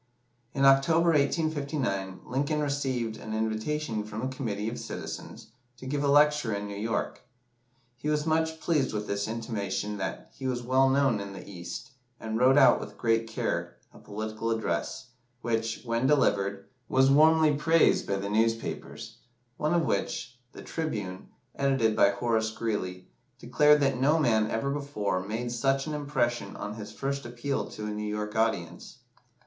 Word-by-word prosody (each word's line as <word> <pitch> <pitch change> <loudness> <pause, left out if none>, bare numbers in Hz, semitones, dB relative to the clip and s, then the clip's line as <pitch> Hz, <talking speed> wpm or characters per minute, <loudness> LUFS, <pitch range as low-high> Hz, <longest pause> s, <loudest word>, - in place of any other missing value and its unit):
In 135 0 +3
October, 160 +5 +5
1859, 140 - 0
Lincoln 140 +4 -1
received 130 -6 -1
an 110 0 -6
invitation 110 +2 -1
from 105 +2 -6
a - - 0
committee 110 -6 -3
of 115 - -4
citizens - - -7 0.3
to 130 - -11
give 145 +2 -1
a - - +2
lecture 145 -5 +4
in 100 0 -4
New 100 - -6
York. 110 +3 -2 0.8
He 145 +5 -3
was 150 0 +1
much 160 0 0
pleased 150 -6 +1
with 105 0 -2
this 100 0 -2
intimation 105 -2 -3
that 95 - -5
he 130 - -5
was 125 -1 -2
well 130 +2 +3
known 135 -5 +3
in 100 0 -6
"the 95 - -10
East," 95 +7 -7 0.3
and 110 0 -3
wrote 130 +2 +5
out - - +7
with - - -9
great 115 -1 +1
care 115 - -3 0.2
a - - -14
political 110 +2 -4
address, 115 +2 -2 0.3
which, 115 -1 -2
when 115 +2 +1
delivered, 100 -8 +1 0.2
was 130 +1 +4
warmly 155 +1 +5
praised 160 +2 +3
by 100 - 0
the 100 +1 -3
newspapers, 115 +2 -2 0.4
one 155 +3 +1
of 170 -2 +2
which, 115 +4 -2 0.2
the - - -10
"Tribune," 105 - -4 0.3
edited 135 -6 +2
by 100 - +5
Horace 110 +1 0
Greeley, 105 -5 -3 0.3
declared 150 +5 +4
that 135 -2 +1
no 150 +4 +4
man 110 -8 +2
ever 125 +5 -1
before 140 -10 -2
made 115 +5 -4
such 135 +3 +1
an 155 - -4
impression 140 -5 -1
on 105 - -5
his 105 -1 -8
first 140 +4 -3
appeal 120 +3 -3
to 105 - -7
a 105 - -3
New 105 0 -3
York 105 0 -4
audience. 100 -7 -1
120 Hz, 165 wpm, -28 LUFS, 105-140 Hz, 0.8 s, out